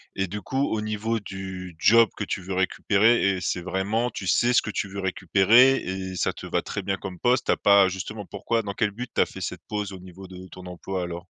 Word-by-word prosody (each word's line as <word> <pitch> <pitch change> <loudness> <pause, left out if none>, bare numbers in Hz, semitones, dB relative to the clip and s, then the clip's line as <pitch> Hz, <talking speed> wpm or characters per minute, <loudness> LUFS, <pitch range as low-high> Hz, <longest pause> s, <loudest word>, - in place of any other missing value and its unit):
et 95 - -1
du 105 +3 -6
coup, 135 +7 -1
au 110 - -1
niveau 110 +2 -2
du 95 -3 -7
job 115 +3 +6
que - - -2
tu 95 - -3
veux 95 +1 -6
récupérer 100 +4 +2
et - - -6
c'est 90 -1 -2
vraiment 100 +6 -1
tu 100 - -7
sais 120 +8 +3
ce - - +5
que 105 - -5
tu 100 -1 -3
veux 100 +1 -6
récupérer, 100 +7 +4
et 95 0 -5
ça 90 - 0
te - - -10
va - - 0
très - - -5
bien 95 0 -2
comme 95 -3 -8
poste? 125 +1 +2
Tu - - +2
as - - +2
pas 100 -1 +5
justement 95 +3 -5
pourquoi 105 +4 -2
dans 100 -1 -4
quel 105 +1 0
but 120 +5 -7
tu - - +2
as - - +4
fait - - -10
cette 90 -1 -5
pause, 105 -2 -3
au 95 - -9
niveau 95 +1 -12
de 95 0 -11
ton 90 0 -11
emploi 90 +1 -5
alors? 85 0 -6
95 Hz, 255 wpm, -25 LUFS, 95-110 Hz, -, job